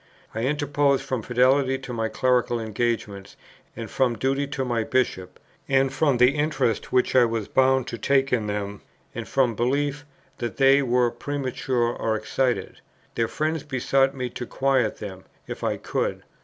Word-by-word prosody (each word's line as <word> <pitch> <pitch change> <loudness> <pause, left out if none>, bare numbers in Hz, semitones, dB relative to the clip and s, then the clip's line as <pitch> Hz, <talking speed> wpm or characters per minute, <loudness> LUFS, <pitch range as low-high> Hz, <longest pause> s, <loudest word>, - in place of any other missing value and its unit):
I 110 - -3
interposed 145 -1 +1
from 130 -3 -2
fidelity 130 +3 +2
to 130 -2 -8
my 115 -1 -1
clerical 125 -1 +1
engagements, 110 -3 -3 0.4
and 115 -1 -6
from 125 -1 +1
duty 135 +4 0
to 135 -1 -3
my 120 -2 0
Bishop; 100 -8 -1 0.3
and 135 0 +2
from 145 -5 +2
the 125 +2 +6
interest 145 -6 -1
which 125 0 +2
I 130 - +7
was 115 -3 -2
bound 130 -1 +3
to 115 - -6
take 135 -1 +2
in 110 -4 +1
them, 105 0 -4 0.3
and - - -6
from 130 -4 +2
belief 140 +5 -1 0.4
that 120 - -4
they 135 +1 +5
were 125 -2 +2
premature 130 -2 -2
or 110 -1 -1
excited. 125 +3 -2 0.3
Their 115 - 0
friends 155 +3 -2
besought 135 -1 +1
me 125 -2 -4
to 125 - -6
quiet 130 -5 +1
them, 95 -3 -8 0.2
if - - -7
I - - 0
could. - - -2
130 Hz, 165 wpm, -24 LUFS, 115-135 Hz, 0.4 s, I